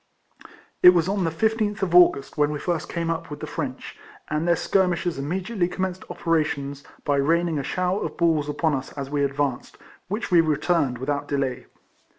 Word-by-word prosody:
It 180 0 +9
was 170 0 +2
on 195 -2 0
the - - +1
15th 215 +4 0
of 175 -3 -1
August, 175 -6 +5
when 150 -1 +2
we 150 - -3
first 170 +1 -2
came 170 -1 -2
up 165 - -4
with 150 -1 -7
the - - -5
French, 140 -5 -6 0.3
and 155 +2 -1
their 170 - +4
skir 190 +2 +2
mishers 175 -3 -2
immediately 180 +6 -1
commenced 185 0 -3
operations 145 -4 -1 0.2
by 145 -1 +2
raining 165 +2 +1
a - - -3
shower 185 +6 -1
of - - -5
balls 160 -4 +2
upon 155 +1 0
us 130 -1 -3
as 140 -1 -6
we 145 -1 +1
advanced, 140 -2 -2 0.3
which 210 +3 -4
we 175 -2 +7
returned 155 -3 +1
without 145 +3 -2
delay. 135 -3 -2
160 Hz, 185 wpm, -24 LUFS, 145-180 Hz, 0.3 s, It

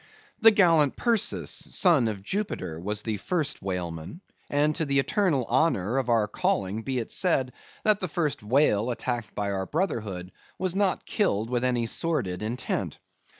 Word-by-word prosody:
The 225 - +8
gallant 165 -9 +4
Perseus, 235 -4 0
a - - -16
son 160 - +4
of 100 -3 -4
Jupiter, 190 - -3
was 105 +4 -3
the 110 -2 -2
first 155 - -1
whaleman; 90 - -5 0.3
and 150 +1 +2
to - - 0
the 140 -1 +1
eternal 145 - +1
honor 130 - +2
of 125 -2 -3
our 115 -3 +3
calling 100 0 -1
be 130 +2 -3
it 115 - -3
said, 135 -9 +1 0.3
that 215 -1 +4
the 185 - -2
first 150 -4 -1
whale 115 -1 +2
attacked 120 -2 -3
by 100 -1 -1
our 95 -1 -2
brotherhood 105 - -2 0.3
was 185 -1 -1
not 195 -1 0
killed 115 - 0
with 125 0 0
any 125 -2 +1
sordid 115 - -1
intent. 115 +4 -3
125 Hz, 165 wpm, -27 LUFS, 105-165 Hz, 0.3 s, The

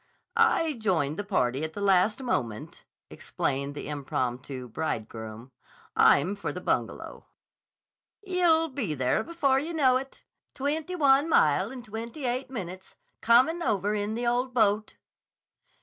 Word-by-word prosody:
"I 455 -9 +3
joined 175 - 0
the - - -1
party 135 - 0
at 160 0 -3
the - - -6
last 200 +5 +2
moment," 115 - -3 0.3
explained 140 +1 -3
the - - -6
impromptu 130 -2 -4
bridegroom. 110 -2 -5 0.4
"I'm 180 +9 +4
for 200 - -4
the - - -6
Bungalow." - - -3 1.0
"Ye'll 345 -4 +3
be 245 - -3
there 130 -2 +1
before 285 -6 +1
ye 320 +5 -4
know 260 -5 +4
it. 270 +1 -9 0.3
Twenty 305 +6 -2
one 285 -1 +4
mile 170 - +3
in 255 -1 -8
twenty 230 +6 -7
eight 250 +2 -2
minutes, 185 -6 -7 0.3
comin' 255 +9 +4
over 205 - 0
in 210 +1 -2
the 240 +1 -3
ole 245 +2 +1
boat." 215 -4 +1
215 Hz, 135 wpm, -27 LUFS, -, 1.0 s, I'm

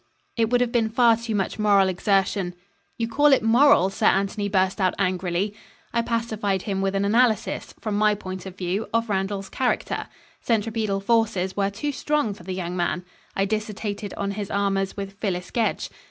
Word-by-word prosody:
"It 225 -2 +1
would 245 0 +3
have 245 -1 +1
been 230 -2 +2
far 230 0 +5
too 230 -1 -4
much 195 +2 -2
moral 200 -2 +4
exertion 190 0 0 0.2
" - - -43
"You 230 - -1
call 290 +6 +3
it 265 - +3
moral?" 225 -4 +5
Sir - - +1
Anthony 200 +1 +1
burst 190 0 +1
out 185 - +2
angrily. 185 +1 0 0.4
I 235 - +2
pacified 220 -5 -1
him 195 -2 -2
with 195 0 0
an 195 0 +1
analysis, 225 +1 +1
from 215 -2 -3
my 210 0 +4
point 185 -2 -7
of 190 0 -10
view, 190 +4 -2
of 230 0 +1
Randall's 195 0 -1
character. 255 -2 -1 0.3
Centripetal 220 -3 0
forces 205 -4 +1
were 200 -1 +1
too 225 +9 -3
strong 295 -6 0
for 195 - -14
the 185 +1 -5
young 180 -1 -4
man. 175 0 -1 0.3
I 195 - +2
dissertated 210 -1 -3
on 200 0 -1
his 200 0 -4
amours 195 -1 0
with 195 0 -6
Phyllis 180 -4 -3
Gedge. 230 -2 -1
200 Hz, 185 wpm, -24 LUFS, 190-225 Hz, 0.4 s, far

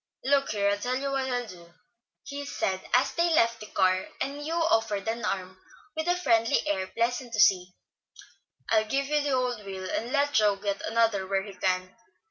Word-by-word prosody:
"Look 275 0 +2
here, 200 -1 +1
I'll 205 - -1
tell 250 +4 -1
you 275 +1 -2
what 265 -1 -1
I'll 245 -1 -1
do," 175 -4 -13 0.5
he 285 0 -6
said, 190 -9 -2
as 250 - +3
they 340 0 +2
left 230 -4 +3
the 215 - -9
car, 185 -2 +1
and 280 +2 -3
Hugh 320 +3 -3
offered 225 - +1
an 230 +1 -2
arm, 185 -2 -3 0.4
with 315 +1 -2
a 355 - +3
friendly 230 -9 +2
air 190 -2 -1
pleasant 240 +3 -2
to - - -2
see. 180 -3 +4 1.0
"I'll 220 -1 +4
give 275 +5 0
you 295 +1 +1
the 290 - -1
old 250 -4 -1
wheel, 190 -1 -6
and 235 +6 -3
let 285 0 +1
Joe 210 -2 +4
get 200 0 -3
another 225 -4 +1
where 195 0 0
he 200 -1 -9
can. 185 +1 -1
225 Hz, 200 wpm, -27 LUFS, 195-270 Hz, 1.0 s, see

